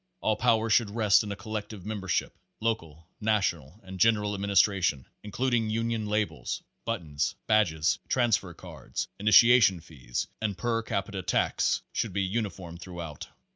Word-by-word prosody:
All 110 - +1
power 115 -1 +2
should 110 -1 +4
rest 105 -1 +4
in 105 - -5
a - - -3
collective 105 -2 -6
membership. 100 -4 -2 0.2
Local, 85 -9 -3
national 100 - -1
and 95 0 -9
general 105 0 +3
administration, 100 -7 +2 0.2
includ 125 +5 -2
ing 115 -2 +2
union 115 -1 -1
labels, 105 0 -2 0.2
buttons, 80 -11 -2
badges, 85 -8 +2
transfer 110 -8 +1
cards, 80 -9 -6
initia 115 +4 +7
tion 95 -4 +4
fees 65 -7 -5 0.2
and 105 -3 -2
per 115 -1 0
capita 100 -3 -3
tax - - +1
should 110 -5 -2
be 100 +1 0
uniform 95 -4 -3
through 90 -1 -9
out. 80 -4 -7
105 Hz, 145 wpm, -28 LUFS, 90-110 Hz, 0.2 s, initia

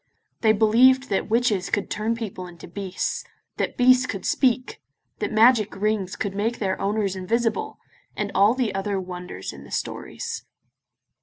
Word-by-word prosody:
They 220 - +4
believed 245 +5 +5
that 195 - -1
witches 220 -5 +1
could 205 - -1
turn 220 +2 -1
people 200 -5 -6
into 170 -2 -12
beasts, 190 +1 -3 0.3
that - - -2
beasts 255 0 +5
could 195 -5 -5
speak, 255 -1 +1 0.4
that - - -2
magic 220 -1 +4
rings 200 -2 -1
could 200 - -3
make 220 +4 -1
their 190 -3 -2
owners 200 -1 0
invisible, 225 +4 -1 0.4
and 205 -1 -2
all 205 +5 +4
the 250 -4 0
other 195 0 -1
wonders 180 - -7
in 70 -1 -11
the - - -14
stories. - - -4
210 Hz, 155 wpm, -24 LUFS, 190-230 Hz, 0.4 s, believed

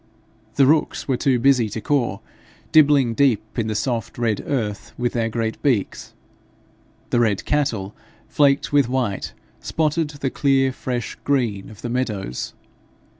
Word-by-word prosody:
The 140 - +5
rooks 155 +3 +1
were 135 - +2
too 130 0 +2
busy 120 -2 +3
to 110 - -5
caw, 120 -4 0 0.5
dibbling 145 -6 +5
deep 115 -4 +1
in 110 - 0
the 110 - -2
soft 115 +1 -2
red 115 -3 0
earth 110 -7 -3
with 120 -1 -1
their 115 -2 0
great 110 0 -3
beaks. 125 -9 -1 1.0
The 120 - +3
red 110 -4 +1
cattle, 110 -9 -1 0.3
flaked 140 0 +2
with 140 -4 +4
white, 125 -6 -2 0.3
spotted 160 0 0
the 140 -3 -4
clear 135 -2 +2
fresh 125 -2 -4
green 120 -9 0
of 110 - -14
the 120 - -3
meadows. 105 - -3
125 Hz, 145 wpm, -22 LUFS, 110-140 Hz, 1.0 s, The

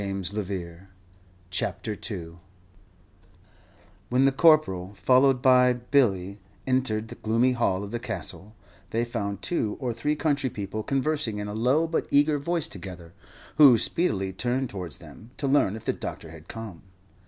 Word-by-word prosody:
GLENCORE 95 -2 -4 0.6
CASTLE 90 -4 -4 1.7
When 130 +2 +3
the 135 - +5
Corporal, 135 - +3
followed 130 +2 +3
by 125 -1 +6
Billy, 110 -7 +1 0.3
entered 120 -4 0
the - - -7
gloomy 115 +4 +2
hall 100 -6 0
of 100 - -7
the 120 - -3
Castle, 110 -3 -6 0.3
they 115 +1 0
found 100 -5 -4
two 110 -12 -1
or 125 -4 -2
three 150 +6 -1
country 145 -3 0
people 105 -1 -5
conversing 135 -3 -1
in 105 0 -4
a 105 - -5
low 130 +9 +2
but 165 0 -2
eager 145 +1 +3
voice 170 +2 -1
together, 90 -3 -9 0.4
who 140 -6 +8
speedily 100 - +1
turned 125 +5 -2
towards 90 -8 -6
them, 110 - -14
to 150 - -3
learn 135 -8 +3
if 110 - -10
the - - +1
doctor 80 - -7
had 80 0 -13
come. 110 -7 -8
115 Hz, 145 wpm, -26 LUFS, 100-135 Hz, 1.7 s, who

